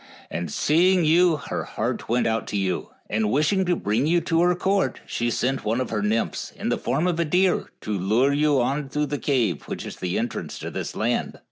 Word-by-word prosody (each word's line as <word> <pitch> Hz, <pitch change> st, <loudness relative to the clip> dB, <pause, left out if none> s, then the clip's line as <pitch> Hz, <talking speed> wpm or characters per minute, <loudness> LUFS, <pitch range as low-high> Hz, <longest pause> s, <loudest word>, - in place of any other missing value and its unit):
And 85 Hz, -2 st, -3 dB
seeing 175 Hz, -, +3 dB
you 170 Hz, +2 st, +5 dB
her -, -, -4 dB
heart -, -, -3 dB
went 120 Hz, +1 st, +2 dB
out 110 Hz, -1 st, 0 dB
to 105 Hz, -, -2 dB
you, 95 Hz, -2 st, -1 dB, 0.2 s
and 110 Hz, -1 st, 0 dB
wishing 155 Hz, -, +2 dB
to 175 Hz, 0 st, +2 dB
bring 115 Hz, +1 st, 0 dB
you 175 Hz, +2 st, +4 dB
to 165 Hz, 0 st, +1 dB
her 180 Hz, 0 st, +3 dB
court, 190 Hz, -6 st, 0 dB
she 120 Hz, 0 st, -1 dB
sent 130 Hz, +3 st, -1 dB
one 115 Hz, +3 st, 0 dB
of 130 Hz, -, -3 dB
her 105 Hz, -2 st, -1 dB
nymphs, 110 Hz, +2 st, -1 dB
in -, -, -3 dB
the -, -, 0 dB
form 160 Hz, -, 0 dB
of 175 Hz, -2 st, 0 dB
a -, -, +3 dB
deer, 180 Hz, +4 st, +2 dB
to 105 Hz, -, -5 dB
lure 110 Hz, +8 st, +2 dB
you 145 Hz, -1 st, +3 dB
on 135 Hz, +3 st, -1 dB
through 150 Hz, +2 st, 0 dB
the 145 Hz, 0 st, -3 dB
cave, 115 Hz, -, +1 dB
which -, -, -5 dB
is -, -, -7 dB
the 90 Hz, 0 st, -2 dB
entrance 120 Hz, +2 st, -3 dB
to -, -, -6 dB
this -, -, -5 dB
land." -, -, -1 dB
135 Hz, 225 wpm, -24 LUFS, 110-170 Hz, 0.2 s, you